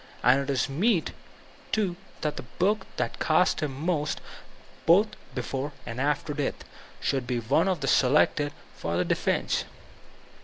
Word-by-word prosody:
And 125 +3 +6
it 140 - -5
is 130 -3 +1
meet, 175 +6 +1 0.6
too, 200 -5 +1 0.3
that 150 -2 -1
the - - -5
book 190 - 0
that - - -2
cost 165 +3 +3
him 150 -2 -1
most, 150 +1 -1 0.7
both 200 +6 +6 0.3
before 135 +3 -3
and 115 +2 -4
after 150 +1 0
death, 145 -2 -3 0.3
should 135 -3 -1
be 125 -1 0
the 115 -2 -5
one 170 +1 +3
selected 145 +2 +3 0.2
for 85 +2 -1
defense. - - 0
145 Hz, 140 wpm, -27 LUFS, 130-170 Hz, 0.7 s, And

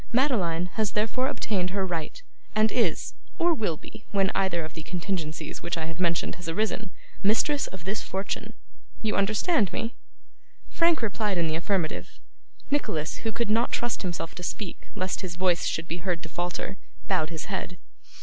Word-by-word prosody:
Madeline 210 - +3
has 215 -3 +2
therefore 225 +5 +2
obtained 195 -9 0
her 195 0 0
right, 165 -4 -3 0.3
and 215 0 +5
is, 220 -10 +2 0.2
or 345 0 +5
will 210 - 0
be, 215 +7 -11
when 195 -1 +3
either 180 -4 +1
of 155 - -9
the 160 - -6
contingencies 165 -2 -3
which 170 +1 -1
I 160 - -1
have 165 +1 -5
mentioned 170 -2 +2
has 165 - -4
arisen, 210 +2 0 0.3
mistress 255 +8 +3
of 190 -3 -9
this 195 +3 -1
fortune. 195 +1 -3 0.5
You 215 - +2
understand 210 - +3
me?' 225 +5 -2 0.8
Frank 335 -6 +4
replied 210 -2 +1
in 170 - +3
the 160 -1 +1
affirmative. 170 -1 -1 0.5
Nicholas, 160 - 0
who 225 - -1
could 230 0 0
not 230 +3 +3
trust 240 -1 0
himself 175 -3 -3
to - - -7
speak 180 +2 -4
lest 185 0 -1
his 180 -3 -4
voice 180 -1 +3
should 160 +1 -1
be 170 - -2
heard 175 -1 -1
to 160 - -6
falter, 175 +3 -2 0.3
bowed 170 -5 +2
his 165 -2 -4
head. 190 -3 -3
190 Hz, 175 wpm, -28 LUFS, 170-215 Hz, 0.8 s, and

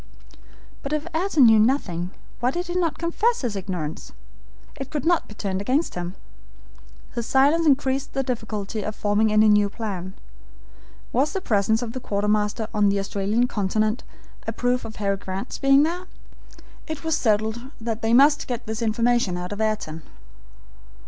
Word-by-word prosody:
But 275 +1 -4
if 305 0 -1
Ayrton 320 -5 +4
knew 225 -1 +7
nothing, 200 -8 +1 0.3
why 245 - +2
did 350 +7 -2
he 350 - -4
not 350 -3 0
confess 420 +8 +1
his 235 -6 -2
ignorance? 180 -6 -5 0.6
It 270 -1 -6
could 300 0 -3
not 345 0 +2
be 210 - -12
turned 195 -2 -2
against 265 +10 0
him. 175 +1 -5 1.0
His 235 -1 -3
silence 295 +5 +4
increased 270 -1 +1
the 270 - 0
difficulty 220 -4 -3
of 210 +1 -4
forming 210 +1 +2
any 215 0 +5
new 210 -1 +4
plan. 195 -4 -5 1.0
Was 270 +5 +2
the 385 - -1
presence 220 - +1
of 230 -1 -5
the 260 - -4
quartermaster 210 +1 0
on 210 -1 +3
the 200 - +1
Australian 200 +4 0
continent 215 +1 0 0.5
a - - 0
proof 245 +2 0
of 220 - -8
Harry 200 -1 -1
Grant's 190 0 -5
being 275 +1 +5
there? 355 +3 -2 0.8
It 315 -3 -5
was 320 -1 +1
settled 220 -2 +1 0.2
that 225 -1 -3
they 225 - 0
must 285 +5 +5
get 245 -1 -4
this 220 +1 -4
information 230 -4 +1
out 180 +1 -5
of 205 +1 -4
Ayrton. 215 -8 -2
225 Hz, 165 wpm, -24 LUFS, 205-275 Hz, 1.0 s, knew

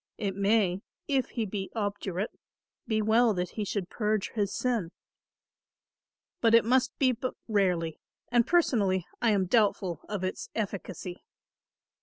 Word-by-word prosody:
It 195 -3 -2
may, 200 -2 +2 0.3
if 270 -3 +1
he 230 -3 -2
be 195 -1 -4
obdurate, 205 -2 -2 0.6
be 220 -2 +1
well 220 0 +4
that 180 0 -2
he 215 - -3
should 195 -2 -2
purge 210 0 -1
his 205 -3 -1
sin; 235 -9 0 1.5
but 230 -1 +5
it 230 - +6
must 255 +2 +2
be 260 -2 +4
but 250 +1 -3
rarely 180 -7 +1 0.3
and, 235 -1 +4
personally, 205 - +2 0.2
I 235 - +4
am 200 -3 +3
doubtful 190 -5 +2
of 205 -3 -3
its 185 - -3
efficacy. 190 -4 -4
210 Hz, 140 wpm, -29 LUFS, 190-230 Hz, 1.5 s, it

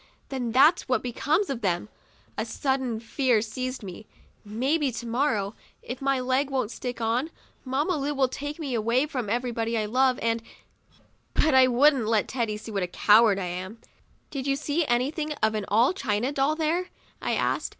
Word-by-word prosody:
Then 250 -4 -3
that's 275 +5 +4
what 255 - +1
becomes 295 - 0
of 250 -3 -4
them." 180 -1 0 0.5
A - - -1
sudden 265 -5 -1
fear 240 0 +1
seized 255 +3 -4
me. 195 +2 -9 0.4
Maybe, 265 +7 0
to 240 0 -6
morrow, 230 -4 0 0.3
if 245 +2 -6
my 275 -1 +1
leg 260 +2 0
won't 260 -5 -1
stick 245 -1 -5
on, 235 +6 0 0.3
Mamma 285 +7 0
Lu 290 +1 -2
will 265 -1 +3
take 290 +3 -5
me 290 -6 -4
away 235 +4 +2
from 250 -8 -4
everybody 235 -1 -1
I 215 - 0
love 255 +3 +2
and 230 0 +1 0.5
— - - -30 0.3
But 310 -1 +3
I 260 -1 +7
wouldn't 255 -1 +4
let 220 -2 +2
Teddy 230 -4 -2
see 215 +1 -9
what 200 -2 -1
a 180 - -1
coward 210 +3 +5
I 195 - -2
am. 185 +5 -5 0.5
'Did 275 -2 -4
you 275 - +2
see 300 +2 -1
anything 290 +6 0
of 220 -6 0
an 210 -2 -2
all 230 - +3
china 245 - -1
doll 285 +2 +1
there?" 330 +3 0 0.3
I - - 0
asked. - - 0
255 Hz, 185 wpm, -26 LUFS, 225-275 Hz, 0.5 s, I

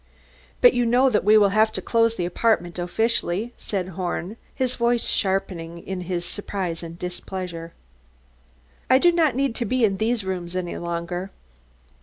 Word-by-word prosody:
"But - - +8
you 245 - +2
know 250 +3 +4
that 210 - +2
we 215 +2 +6
will 205 -2 +5
have 215 +2 +3
to - - -1
close 230 -1 +2
the 175 - -2
apartment 180 -2 0
officially," 220 +3 0
said 190 -3 -4
Horn, 185 +2 -4 0.2
his 255 -1 0
voice 235 -1 +1
sharpening 190 -4 -1
in 185 +1 -5
his 175 -1 -3
surprise 185 -3 -3
and 165 0 -8
displeasure. 180 -2 -6 1.2
"I 260 - +7
do 345 +6 +5
not 325 -6 +2
need 270 -2 +1
to 240 - -1
be 250 +2 +2
in 195 -2 0
these 225 +1 0
rooms 180 -2 -4
any 180 -1 -3
longer." 170 +2 -4
195 Hz, 165 wpm, -24 LUFS, 175-230 Hz, 1.2 s, But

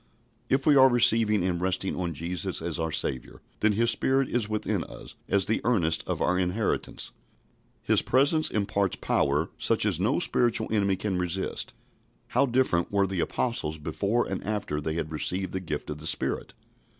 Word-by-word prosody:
If 135 0 +1
we 150 - +5
are 135 -1 +7
receiving 115 -4 +3
and 90 -1 -1
resting 95 +1 -1
on 85 -3 -3
Jesus 90 +4 -3
as 85 0 -3
our 80 -1 -1
Saviour, 70 -5 -3 0.2
then 105 0 +3
His 115 +3 +3
Spirit 135 +3 +1
is 115 -3 0
within 110 0 -1
us - - -11 0.2
as 100 -1 +3
the 110 +3 0
earnest 85 -10 +1
of - - -1
our 90 0 +1
inheritance. 95 +4 -2 0.7
His - - +4
presence 145 +5 +3
imparts 100 -2 0
power 75 +4 0
such - - +2
as - - +1
no - - +1
spiritual 120 -2 +1
enemy 100 -3 +2
can 95 -1 -2
resist. 90 +1 -3 0.5
How 140 +3 +2
different 120 -9 +1
were 100 -1 +2
the 95 -1 -3
Apostles 85 -8 -1
before 100 +9 -1
and 95 - -4
after 105 -8 -3
they 80 +1 -3
had 80 -2 -3
received 90 +4 -1
the 95 - -1
gift 90 - -5
of 75 - -6
the 80 - -3
Spirit! - - 0
95 Hz, 175 wpm, -27 LUFS, 85-115 Hz, 0.7 s, are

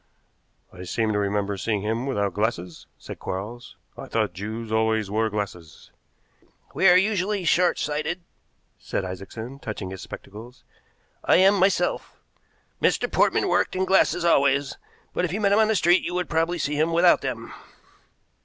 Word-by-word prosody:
"I 90 - -11
seem 110 +4 -1
to 105 - 0
remember 100 0 -1
seeing 105 +1 -2
him 115 +5 -2
without 100 -7 -1
glasses," 90 -6 -3
said - - -10
Quarles. 110 +6 -6 0.2
"I - - -9
thought - - -1
Jews 110 +3 -6
always 110 -2 +1
wore 110 +1 +1
glasses." 95 -7 -6 0.8
"We 190 - +3
are 180 - +7
usually 200 0 0
short 175 +1 +3
sighted," 155 +4 -2 0.6
said - - -3
Isaacson, 110 +8 -8
touching 105 -6 -6
his 95 - -8
spectacles, 115 +5 -11 0.6
"I - - +4
am 190 +3 +6
myself. 185 -2 0 0.6
Mr. - - +1
Portman - - +2
worked - - +1
in 190 0 0
glasses 190 -2 +2
always, 140 -3 +2 0.4
but - - -1
if 175 - -1
you 200 - -2
met 200 -2 +2
him 205 - +4
in 220 - +4
the 220 - +1
street 175 0 +4
you 175 - -4
would 180 -1 -2
probably 165 +2 +1
see 150 -2 -2
him 155 +3 +1
without 170 +1 +5
them." 120 -4 -5
125 Hz, 165 wpm, -24 LUFS, -, 0.8 s, are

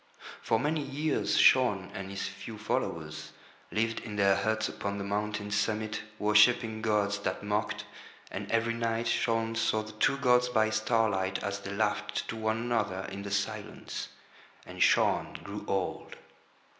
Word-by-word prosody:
For 115 - +1
many 150 +3 0
years 150 +2 0
Shaun 105 -8 +5
and 95 0 -6
his 100 0 -3
few 105 +3 -8
followers 105 +1 -3 0.4
lived 115 +1 0
in 105 -2 -7
their 100 -1 +4
huts 110 +3 0
upon 100 0 -4
the 100 - -3
mountain's 105 0 -2
summit 110 +1 -1 0.2
worshipping 110 +1 +4
gods 105 -2 +1
that 100 - -3
mocked, 105 +1 -1 0.5
and - - -5
every 115 0 +2
night 115 0 -1
Shaun 115 -1 +1
saw 110 -1 +1
the 110 - -9
two 110 +5 +2
gods 125 -2 +4
by 110 -2 +2
starlight 110 -4 +1
as 100 0 -2
they 100 0 -7
laughed 105 +1 -1
to - - -3
one 110 0 0
another 115 -5 -1
in 100 - -5
the 100 - -5
silence. 100 +1 -3 0.6
And - - -8
Shaun - - +3
grew - - -6
old. 95 -1 -2
110 Hz, 155 wpm, -30 LUFS, 100-115 Hz, 0.6 s, Shaun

